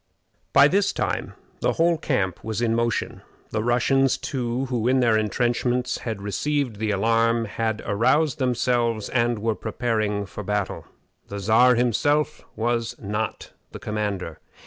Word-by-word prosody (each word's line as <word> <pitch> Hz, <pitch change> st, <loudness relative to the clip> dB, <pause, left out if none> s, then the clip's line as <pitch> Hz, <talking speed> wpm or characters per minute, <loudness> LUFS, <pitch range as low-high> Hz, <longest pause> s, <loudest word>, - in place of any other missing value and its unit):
By 140 Hz, -, +7 dB
this 195 Hz, +6 st, +1 dB
time -, -, -2 dB, 0.2 s
the -, -, +1 dB
whole 165 Hz, -1 st, +2 dB
camp 100 Hz, -, -1 dB
was 110 Hz, -1 st, -3 dB
in 115 Hz, -1 st, +1 dB
motion. 115 Hz, -1 st, -1 dB, 0.3 s
The 110 Hz, -, -1 dB
Russians, 130 Hz, +3 st, +2 dB
too, 125 Hz, -2 st, -2 dB
who 120 Hz, -3 st, -1 dB
in 130 Hz, +1 st, +3 dB
their 115 Hz, -3 st, +3 dB
intrenchments 120 Hz, +3 st, 0 dB
had 110 Hz, -4 st, -5 dB
received 130 Hz, +3 st, -1 dB
the 110 Hz, +1 st, -2 dB
alarm, 115 Hz, +3 st, +2 dB
had 110 Hz, 0 st, -2 dB
aroused 135 Hz, +9 st, +2 dB
themselves 120 Hz, -3 st, 0 dB
and 120 Hz, -1 st, +1 dB
were 110 Hz, +1 st, 0 dB
preparing 110 Hz, -2 st, -2 dB
for 95 Hz, -, -8 dB
battle. 105 Hz, -1 st, -3 dB, 0.4 s
The 100 Hz, -, -6 dB
Czar 115 Hz, +5 st, +5 dB
himself 145 Hz, +6 st, +1 dB
was 115 Hz, 0 st, -1 dB
not 105 Hz, +1 st, -4 dB, 0.2 s
the -, -, -7 dB
commander. 105 Hz, -6 st, -3 dB
115 Hz, 145 wpm, -24 LUFS, 110-125 Hz, 0.4 s, By